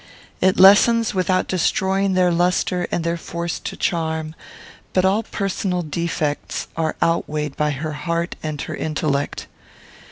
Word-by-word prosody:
It 190 0 +3
lessens 220 +4 +6
without 185 -1 +1
destroying 190 +2 +1
their 180 -1 +3
lustre 180 +1 +1
and 170 - -1
their 170 0 -1
force 170 0 -4
to - - -6
charm; 160 -2 -1 0.6
but 185 0 +3
all 195 +4 +3
personal 195 -4 -2
defects 155 -2 -3
are 160 -1 -1
outweighed 150 -3 -1
by 150 0 +1
her 150 +2 -3
heart 170 +3 -2
and 155 -2 -4
her - - -5
intellect. 150 -2 -2
170 Hz, 135 wpm, -21 LUFS, 155-185 Hz, 0.6 s, lessens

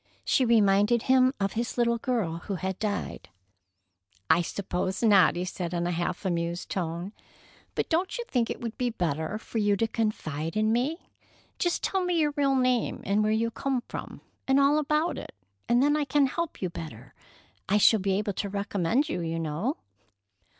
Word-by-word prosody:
She 260 - +3
reminded 215 0 +4
him 260 0 +4
of 195 0 -1
his 235 +2 -3
little 235 -1 +2
girl 225 -10 -1
who 200 - -2
had 190 +1 -4
died. 205 - -3 1.0
"I 175 - +5
suppose 185 +2 -3
not," 200 -6 +6
he 175 +1 -2
said 180 -1 -4
in 170 0 -1
a 175 - 0
half 175 +3 -3
amused 170 -1 -2
tone. 175 +2 -3 0.6
"But - - -1
don't 355 +8 0
you 475 - -4
think 240 -3 0
it - - -4
would 230 -1 -4
be 250 -1 +1
better 165 -2 -2
for 225 +1 -4
you 205 -1 +2
to 225 - +1
confide 165 -7 -2
in 215 +1 +2
me? 280 +9 -2 0.5
Just 350 -1 0
tell 385 -1 0
me 360 -1 0
your 300 -2 +2
real 280 -2 +2
name, 255 -2 +1
and 200 +2 +2
where 215 - +1
you 230 +1 +1
come 260 0 -2
from, - - -7 0.3
and 270 +1 +4
all 280 +2 +4
about 305 +3 0
it, - - -10 0.3
and 240 +2 +4
then 290 +1 +3
I 300 -1 0
can 280 +1 +3
help 330 - -3
you 180 - -1
better. 135 -8 -9 0.6
I 205 - +4
shall 215 +1 +5
be 195 0 0
able 205 -1 -1
to 200 +2 -3
recommend 200 - 0
you, 245 - -3
you 165 0 -2
know." 165 - -2
215 Hz, 190 wpm, -27 LUFS, 180-260 Hz, 1.0 s, not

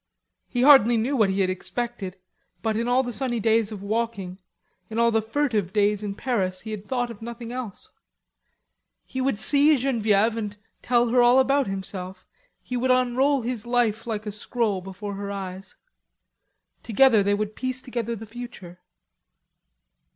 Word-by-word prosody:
He 245 -2 -1
hardly 250 -5 +7
knew 245 +6 0
what 215 -6 +3
he 190 +1 0
had 185 -1 +2
expected, 200 -1 -4 0.5
but 220 -1 0
in 230 +2 -1
all 250 +2 +3
the 245 -1 -5
sunny 240 +1 -1
days 220 0 +2
of 200 -2 -7
walking, 205 -4 -3 0.5
in 220 - -5
all 235 0 +4
the 225 0 +2
furtive 220 - -1
days 205 0 +2
in 205 -1 -4
Paris, 195 -7 -1
he 220 - -7
had 210 -1 -7
thought 245 -2 -1
of 225 - -12
nothing 235 0 -7
else. 245 -6 -7 1.1
He 260 - -4
would 265 -4 0
see 290 +6 +5
Genevieve 225 -4 +2
and 210 -2 -4 0.2
tell 240 -1 +2
her 245 +1 +4
all 240 +1 +6
about 275 +1 +3
himself; 190 -1 -5 0.4
he 250 - -5
would 250 +1 0
unroll 255 +2 +2
his 235 -2 -4
life 235 -2 +1
like 215 -2 -3
a 210 - -3
scroll 210 -1 -2
before 195 +2 -7
her 200 0 -5
eyes. 190 -1 -7 1.1
Together 235 -1 +4
they 200 +1 +2
would 215 +1 -3
piece 255 0 -3
together 235 -2 -3
the 225 0 -9
future. 225 -6 -10
225 Hz, 165 wpm, -25 LUFS, 205-245 Hz, 1.1 s, hardly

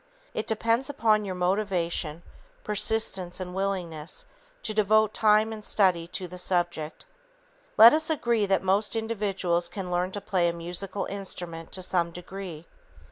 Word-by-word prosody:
It 215 - -3
depends 230 +4 +1
upon 220 -6 +2
your 190 -2 -4
motivation, 180 -4 -1 0.4
persistence 210 -4 -1
and 180 -1 -5
willingness 185 - -3 0.4
to 215 - -2
devote 215 0 +3
time 215 0 +3
and 215 -1 -8
study 185 -6 +2
to 180 +1 -4
the 180 +1 -8
subject. 175 - -1 0.7
Let 225 +4 +10
us 315 +1 +1
agree 235 -8 +1
that 195 -1 +2
most 195 +4 +2
individuals 195 -6 0
can 180 0 -5
learn 180 +1 0
to 205 - -3
play 180 -3 +1
a - - -2
musical 180 +4 -3
instrument 175 -4 -5
to 185 - -2
some 175 -2 +1
degree. 180 -1 -8
190 Hz, 145 wpm, -27 LUFS, 175-215 Hz, 0.7 s, Let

